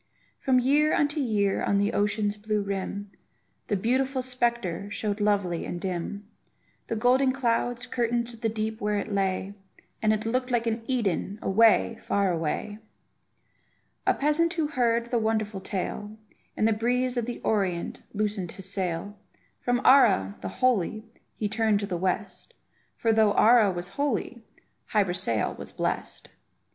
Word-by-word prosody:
From 260 -1 +2
year 290 +4 +3
unto 295 +1 +1
year 210 -7 +1
on 200 - +1
the 205 +2 +1
ocean's 205 0 0
blue 210 0 -1
rim, 200 0 -4 0.6
The 205 - 0
beautiful 260 +5 0
spectre 235 -7 -1
showed 205 0 -3
lovely 200 -5 +1
and 175 - -5
dim; 190 +2 -4 0.6
The - - -2
golden 255 +4 +3
clouds 245 -1 0
curtained 240 -1 0
the 230 -1 -3
deep 220 0 -3
where 210 0 0
it 205 - -3
lay, 195 0 -1 0.5
And 215 -1 +3
it 215 0 -1
looked 255 +3 0
like 240 -2 +1
an 225 0 -1
Eden, 205 -5 -1
away, 225 +3 +3
far 200 -2 +1
away! 170 +6 -2 1.3
A - - +4
peasant 330 +4 +2
who 315 -3 0
heard 235 -5 +1
of 235 - -15
the 240 - +2
wonderful 215 -2 -1
tale, 205 +3 -4 0.4
In - - +2
the 225 - +4
breeze 245 +3 0
of 240 -2 -1
the 245 - -4
Orient 190 -5 -1
loosened 205 -4 -2
his 190 -1 -6
sail; 190 +2 -3 0.4
From 245 0 0
Ara, 100 - +5
the 95 - -4
holy, 215 - 0 0.3
he 210 - -1
turned 215 0 +1
to 200 - -2
the 190 -3 -3
west, 185 +2 -3 0.4
For 225 -1 +2
though 215 -2 +4
Ara 225 -2 +6
was 175 0 -5
holy, 250 -2 -2 0.5
Hy 210 -2 +3
Brasail 175 - 0
was - - -7
blest. - - -3
215 Hz, 155 wpm, -27 LUFS, 200-240 Hz, 1.3 s, Ara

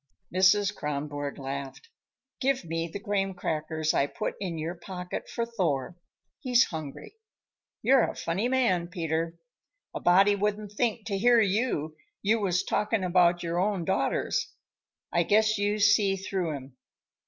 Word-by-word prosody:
Mrs. 200 +2 +4
Kronborg 145 -1 -4
laughed. 140 - -6 0.5
"Give 265 -6 0
me 165 0 -2
the 165 - -6
graham 195 -1 -1
crackers 155 -1 -1
I 140 - +2
put 215 - -3
in 180 -4 -3
your 160 +2 -3
pocket 180 0 -7
for 235 - -2
Thor. 175 - -1 0.4
He's 250 -1 +4
hungry. 155 - -7 0.7
You're 265 -2 +5
a - - -7
funny 190 +8 -1
man, 230 -10 +2
Peter. 165 -2 -2 0.6
A - - -4
body 195 +3 +5
wouldn't 210 0 -2
think, 220 0 -1
to 200 -2 -2
hear 240 +2 +5
you, 200 - 0 0.3
you 220 +3 +3
was 185 -3 +1
talking 210 -1 0
about 175 -1 +3
your 170 +1 -1
own 190 -2 0
daughters. - - 0 0.6
I 170 - +3
guess 215 +4 +3
you 205 +1 +1
see 205 -1 +4
through 190 -4 -2
'em. 130 -1 -10
185 Hz, 145 wpm, -28 LUFS, 165-210 Hz, 0.7 s, You're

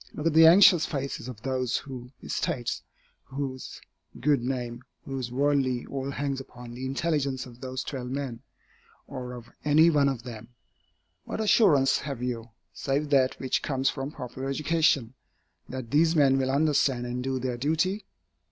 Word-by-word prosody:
Look 150 - -5
at 165 - +3
the 160 +1 +8
anxious 175 -1 +7
faces 140 -5 -4
of 115 -4 -9
those 130 -2 0
whose 125 -3 -8
estates, 120 -1 -2 0.4
whose 135 -1 -5 0.4
good 145 -4 +2
name, 120 -1 -3 0.2
whose 130 -3 -4
worldly 135 -2 +1
all 135 0 -4
hangs 140 -1 -2
upon 125 -2 -11
the 130 +2 -5
intelligence 135 -2 -1
of 120 -1 -14
those 130 0 -4
twelve 125 -3 -5
men, 130 -3 -4 0.6
or 125 -2 -6
of 120 -1 -10
any 155 +3 +5
one 145 -3 +3
of 125 -4 -4
them. 120 -1 -10 0.7
What - - -5
assurance 190 - +4
have 135 -4 -5
you, 120 -2 -3 0.2
save 145 +2 -2
that 130 -2 +3
which 130 -1 0
comes 135 -2 0
from 135 0 -4
popular 130 +2 -6
education, 145 -4 +1 0.6
that 130 -3 -6
these 160 +3 +4
men 135 -3 +4
will 130 0 0
understand 140 -3 +2
and 125 +1 -3
do 135 0 -1
their 125 -1 -2
duty? 160 - 0
135 Hz, 160 wpm, -27 LUFS, 125-145 Hz, 0.7 s, the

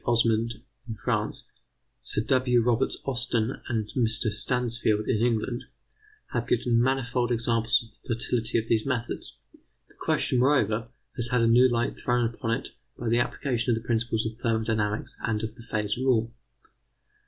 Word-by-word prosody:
Osmond, 115 -1 +2 0.3
in 110 - -3
France; - - -2 0.6
Sir 105 - -2
W. 125 -2 +3
Roberts 120 +2 +1
Austen 120 -2 -1
and 115 -4 -1
Mr. 115 -3 +2
Stansfield, 110 -1 0
in - - +2
England, 120 0 0 0.7
have 120 -1 -1
given 120 -1 +2
manifold 125 -1 0
examples 115 +1 +2
of 115 +3 -16
the 115 - +2
fertility 115 -1 0
of 110 - 0
these 110 -2 +2
methods. 125 -3 -3 0.5
The - - -19
question, 125 - +1
moreover, 115 -5 +2 0.3
has 120 -1 0
had 125 0 +1
a 115 - +4
new 125 +3 +6
light 120 +1 -1
thrown 120 -1 +1
upon 115 0 -5
it 115 - -1 0.3
by 120 - -3
the 120 +1 +3
application 120 0 -1
of 120 - +4
the 115 - -16
principles 115 -1 0
of 110 +1 -5
thermodynamics 110 -3 -1
and 110 -2 -1
of 110 - -3
the 125 - -14
phase 105 -2 -2
rule. 115 -3 +1
115 Hz, 160 wpm, -27 LUFS, 110-125 Hz, 0.7 s, new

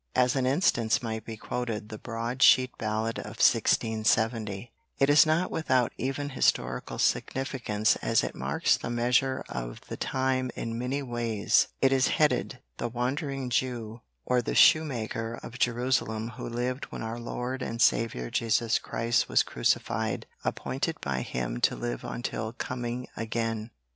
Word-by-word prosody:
As 125 0 +3
an 130 -2 +1
instance 130 - +2
might 110 -1 -4
be 110 -1 -7
quoted 115 -2 -4
the 110 - -7
broad 120 +2 -4
sheet 130 -1 +6
ballad 110 +1 -1
of - - -8
1670. 110 -1 +2 0.3
It 135 - +3
is 150 +2 +7
not 160 +3 +1
without 130 -6 +1
even 135 +3 -3
historical 130 - 0
significance 115 -5 0
as - - +1
it - - -3
marks - - +1
the - - -5
measure 125 +2 +1
of - - -5
the - - -5
time 130 -1 0
in 115 0 -4
many 135 +3 -2
ways. 120 -4 +1 0.2
It 135 - +5
is 130 -1 +3
headed: 150 -3 +1 0.2
"The 120 - -2
Wandering 130 +2 -2
Jew, 115 -2 -2 0.2
or 125 -1 +2
the - - -3
Shoemaker 120 -6 +3
of 120 +2 -9
Jerusalem 120 -2 0
who 120 +1 -7
lived 125 +2 -2
when - - -7
Our 115 +1 -4
Lord 125 +2 -4
and 115 -2 -4
Saviour 110 - +2
Jesus 115 0 +1
Christ 115 0 0
was - - +4
crucified - - -1 0.2
appointed 150 +5 -2
by 65 -2 -2
Him - - -3
to - - +3
live - - -4
until 110 -2 -4
Coming 120 0 -4
again. 115 0 -2
120 Hz, 150 wpm, -28 LUFS, 110-130 Hz, 0.3 s, is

